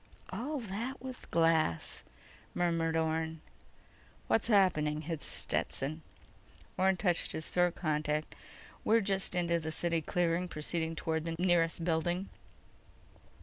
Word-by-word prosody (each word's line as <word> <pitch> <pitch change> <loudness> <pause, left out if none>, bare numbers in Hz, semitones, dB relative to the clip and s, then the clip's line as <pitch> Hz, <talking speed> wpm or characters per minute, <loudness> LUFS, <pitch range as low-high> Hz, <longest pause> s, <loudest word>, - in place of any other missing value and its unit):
"All 250 +11 -3
that 230 +4 -4
with 260 -1 -8
glass," 165 - +2 0.5
murmured 165 -2 +1
Orne. 160 0 -1 0.9
"What's 225 - +2
happening?" 155 -8 +3
hissed 160 -1 0
Stetson. 155 +4 -1 0.7
Orne 190 0 +3
touched 175 -4 0
his 160 - -2
throat 175 -1 +2
contact. 150 -1 -1 0.5
_"We're 225 +1 +4
just 195 -2 0
into 170 -1 +2
the 160 -1 -4
city 165 0 0
clearing, 175 +2 0
proceeding 165 0 -2
toward 160 0 -1
the 165 -1 -2
nearest 170 -2 +2
building." 175 +3 0
170 Hz, 115 wpm, -32 LUFS, 160-185 Hz, 0.9 s, We're